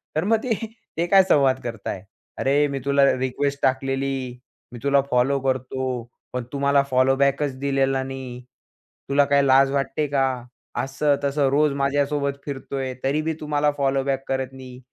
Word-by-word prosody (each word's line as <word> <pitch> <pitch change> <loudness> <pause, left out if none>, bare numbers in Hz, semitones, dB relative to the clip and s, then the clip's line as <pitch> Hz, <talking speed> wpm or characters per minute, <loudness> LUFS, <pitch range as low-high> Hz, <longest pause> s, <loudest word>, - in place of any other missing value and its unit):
तर 155 - +1
मग 225 +4 +3 0.6
ते 170 - 0
काय 195 +1 +6
संवाद 135 -7 +3
करतायत, 110 -5 -5 0.3
अरे, 145 +2 +2
मी 140 -1 -3
तुला 140 0 +3
रिक्वेस्ट 140 +2 -1
टाकलेली. 135 -1 -1 0.4
मी 120 - -8
तुला 140 0 +4
फॉलो 125 +3 +2
करतो, 130 -1 -2 0.3
पण 125 -1 -2
तू 140 - -4
मला 140 0 +4
फॉलो 130 0 +3
बॅकच 140 0 +1
दिलेला 135 -1 +1
नाही. 130 -2 -7 0.7
तुला 140 +1 +4
काय 140 0 +3
लाज 135 0 +4
वाटते 140 +2 -1
का? 135 -1 +1 0.6
असं-तसं 140 +1 0
रोज 150 +2 +3
माझ्यासोबत 140 0 0
फिरतोय, 135 -2 -4
तरी 140 +3 +1
बी 160 +1 -1
तू 150 - -7
मला 150 0 +2
फॉलोबॅक 135 -1 0
करत 130 -1 -2
नाही. 130 -1 -11
135 Hz, 155 wpm, -23 LUFS, 130-140 Hz, 0.7 s, काय